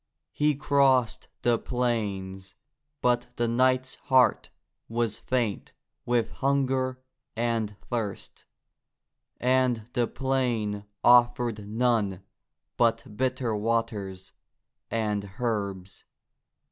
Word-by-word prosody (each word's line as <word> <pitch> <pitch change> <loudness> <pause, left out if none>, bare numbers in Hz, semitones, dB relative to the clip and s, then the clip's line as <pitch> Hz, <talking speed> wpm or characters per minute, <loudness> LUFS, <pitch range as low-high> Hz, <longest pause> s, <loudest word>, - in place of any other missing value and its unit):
He 150 0 +2
crossed 135 -4 +2 0.2
the 120 -1 +3
plains, 100 -6 -2 0.5
but 125 0 +2
the 120 - 0
knight's 130 +2 +2 0.2
heart 130 -2 +4 0.4
was 115 -2 -1
faint 120 -6 -2 0.3
with 120 -2 +1
hunger 130 -2 0 0.4
and 115 -2 -1
thirst, 115 -5 -4 0.9
and 125 -3 +2
the 120 -3 +1
plain 120 -7 -1 0.2
offered 120 -3 +4
none 110 -4 0 0.5
but 115 -1 +1
bitter 130 -2 0
waters 105 -4 -2 0.6
and 105 -3 -1
herbs. 100 -5 -3
120 Hz, 85 wpm, -27 LUFS, 105-130 Hz, 0.9 s, heart